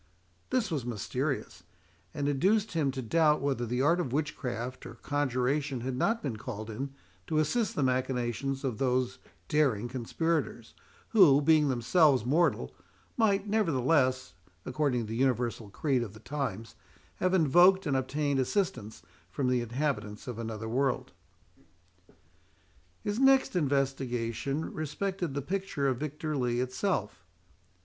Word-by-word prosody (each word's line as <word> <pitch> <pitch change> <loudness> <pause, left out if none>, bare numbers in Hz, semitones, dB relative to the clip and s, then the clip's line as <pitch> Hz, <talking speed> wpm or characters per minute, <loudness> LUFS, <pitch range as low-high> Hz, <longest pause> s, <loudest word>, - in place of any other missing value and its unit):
This 240 -7 0
was 145 -6 -1
mysterious, 120 -2 -3 0.5
and 145 +6 -2
induced 195 +10 +2
him 155 -5 +1
to 130 -1 -4
doubt 150 +4 +3
whether 135 -4 -1
the 125 +3 0
art 170 +5 +3
of 160 -9 -2
witchcraft 130 -4 -3
or - - -10
conjuration 140 -1 -1
had 130 +1 -3
not 225 - 0
been 125 -7 -3
called 110 -2 -6
in 135 +5 -5 0.3
to 155 - -1
assist 200 +8 +1
the 145 - +1
machinations 130 +1 -1
of 125 -6 -2
those 130 -1 0 0.3
daring 135 -8 +2
conspirators, 130 -1 -2 0.4
who, 175 -11 +6
being 150 0 +4
themselves 130 - +3
mortal, 165 +7 +1 0.4
might, 205 -3 +2
nevertheless, 135 - +1 0.3
according 130 -2 0
to - - -4
the 110 - -4
universal 120 -4 0
creed 130 +4 0
of 110 -4 -5
the 110 - -13
times, 115 -7 -4 0.4
have 185 +1 +1
invoked 180 +4 +5
and 140 - 0
obtained 140 +1 0
assistance 130 - -2 0.3
from 130 -3 -1
the 125 -1 +2
inhabitants 120 -4 -3
of 120 -2 -5
another 110 -1 -5
world. 130 +3 0 1.9
His 205 +2 -2
next 270 -5 +4
investigation 135 -2 -1
respected 170 +1 -3
the 140 - -2
picture 185 -5 -2
of 130 -2 +1
Victor 150 +1 -3
Lee 120 -3 0
itself. 130 +10 -2
135 Hz, 135 wpm, -30 LUFS, 125-155 Hz, 1.9 s, who